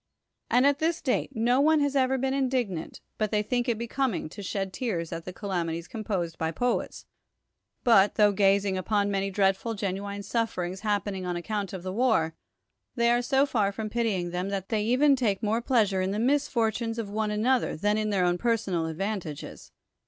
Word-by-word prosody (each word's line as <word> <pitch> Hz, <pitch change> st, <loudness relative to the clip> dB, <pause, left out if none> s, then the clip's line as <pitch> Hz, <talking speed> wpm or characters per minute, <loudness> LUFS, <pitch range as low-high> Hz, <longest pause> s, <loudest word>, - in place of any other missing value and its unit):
And 250 Hz, +2 st, +4 dB
at 285 Hz, 0 st, +3 dB
this 325 Hz, +1 st, 0 dB, 0.3 s
no 245 Hz, +2 st, +2 dB
one 310 Hz, +1 st, +4 dB
has 285 Hz, -1 st, 0 dB
ever 265 Hz, 0 st, +2 dB
been 265 Hz, +1 st, 0 dB
indignant, 250 Hz, -11 st, -2 dB, 0.2 s
but 215 Hz, -1 st, +1 dB
they 210 Hz, 0 st, +1 dB
think 245 Hz, +3 st, -1 dB
it 230 Hz, -, +1 dB
becoming 235 Hz, -, -2 dB
to 205 Hz, -, -9 dB
shed 195 Hz, -1 st, -3 dB
tears 180 Hz, -7 st, -3 dB
at 165 Hz, 0 st, -5 dB
the 185 Hz, -, -5 dB
calamities 175 Hz, -3 st, -3 dB
composed 190 Hz, -7 st, -3 dB
by 160 Hz, -, 0 dB
poets, 245 Hz, +9 st, -2 dB, 0.8 s
but, 205 Hz, -4 st, +5 dB
tho 210 Hz, -1 st, +5 dB
gazing 195 Hz, -1 st, +2 dB
upon 205 Hz, +1 st, 0 dB
many 195 Hz, 0 st, 0 dB
dreadful 195 Hz, +3 st, +1 dB
genuine 200 Hz, 0 st, -4 dB
sufferings 190 Hz, -4 st, -2 dB
happening 205 Hz, -3 st, -2 dB
on 175 Hz, -1 st, -2 dB
ac 175 Hz, -, -6 dB
count 205 Hz, -2 st, -3 dB
of 185 Hz, -3 st, -7 dB
the 185 Hz, 0 st, -4 dB
war, 220 Hz, -9 st, +2 dB, 0.6 s
they 235 Hz, -1 st, +3 dB
are 240 Hz, 0 st, +3 dB
so 270 Hz, +2 st, +3 dB
far 215 Hz, -8 st, +1 dB
from 215 Hz, +1 st, -5 dB
pitying 210 Hz, -7 st, -1 dB
them, 180 Hz, +2 st, -2 dB
that 195 Hz, -1 st, -4 dB
they 215 Hz, -2 st, 0 dB
even 265 Hz, +6 st, +4 dB
take 220 Hz, -5 st, 0 dB
more 220 Hz, +2 st, +1 dB
pleasure 215 Hz, -7 st, +2 dB
in 185 Hz, -, 0 dB
the 200 Hz, -, -2 dB
misfortunes 230 Hz, -3 st, 0 dB
of 215 Hz, -3 st, -4 dB
one 215 Hz, 0 st, -1 dB
another 230 Hz, +2 st, +1 dB
than 205 Hz, +5 st, +1 dB
in 215 Hz, 0 st, 0 dB
their 190 Hz, -3 st, +2 dB
own 175 Hz, 0 st, +1 dB
personal 205 Hz, -8 st, 0 dB
advantages. 165 Hz, -2 st, -5 dB
210 Hz, 190 wpm, -27 LUFS, 190-240 Hz, 0.8 s, but